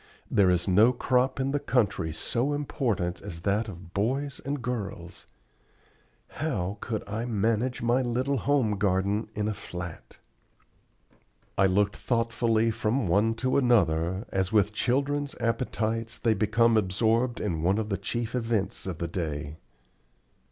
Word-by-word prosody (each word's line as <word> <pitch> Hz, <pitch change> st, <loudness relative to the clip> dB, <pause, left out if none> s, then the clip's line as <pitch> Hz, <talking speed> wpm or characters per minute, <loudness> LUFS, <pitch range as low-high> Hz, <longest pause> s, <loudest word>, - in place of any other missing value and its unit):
There 100 Hz, -2 st, +4 dB
is 90 Hz, 0 st, +2 dB
no 105 Hz, +6 st, +5 dB
crop 130 Hz, +2 st, +1 dB
in 135 Hz, +1 st, 0 dB
the 145 Hz, -, 0 dB
country 105 Hz, -12 st, 0 dB
so 120 Hz, -, -1 dB
important 115 Hz, -11 st, -1 dB
as 85 Hz, -1 st, -7 dB
that 105 Hz, +4 st, 0 dB
of 90 Hz, -3 st, -10 dB
boys 135 Hz, +7 st, -1 dB
and 140 Hz, +2 st, -2 dB
girls. 105 Hz, -8 st, -5 dB, 1.0 s
How 105 Hz, -, -3 dB
could 110 Hz, -4 st, -4 dB
I 110 Hz, +3 st, -3 dB
manage 115 Hz, +2 st, 0 dB
my 120 Hz, +2 st, +3 dB
little 130 Hz, +3 st, 0 dB
home 120 Hz, -6 st, +1 dB
garden 100 Hz, +2 st, +1 dB
in 105 Hz, 0 st, -1 dB
a 110 Hz, -, 0 dB
flat? 90 Hz, -4 st, -8 dB, 1.4 s
I 95 Hz, -, +4 dB
looked 100 Hz, +2 st, +2 dB
thoughtfully 115 Hz, -1 st, +1 dB
from 110 Hz, +1 st, 0 dB
one 105 Hz, +6 st, +2 dB
to 130 Hz, -, +3 dB
another, 95 Hz, -, +2 dB
as 95 Hz, -1 st, -1 dB
with 105 Hz, -1 st, +3 dB
children's 140 Hz, +5 st, 0 dB
appetites 115 Hz, -1 st, -1 dB
they 115 Hz, -2 st, +2 dB
became 110 Hz, +2 st, +3 dB
absorbed 110 Hz, +5 st, +1 dB
in 85 Hz, -7 st, -2 dB
one 95 Hz, +5 st, +2 dB
of 110 Hz, -1 st, -2 dB
the 100 Hz, -, 0 dB
chief 120 Hz, -1 st, -3 dB
events 115 Hz, -6 st, -1 dB
of 90 Hz, -4 st, -4 dB
the 85 Hz, -, -3 dB
day. 75 Hz, -3 st, -4 dB
110 Hz, 145 wpm, -27 LUFS, 95-120 Hz, 1.4 s, no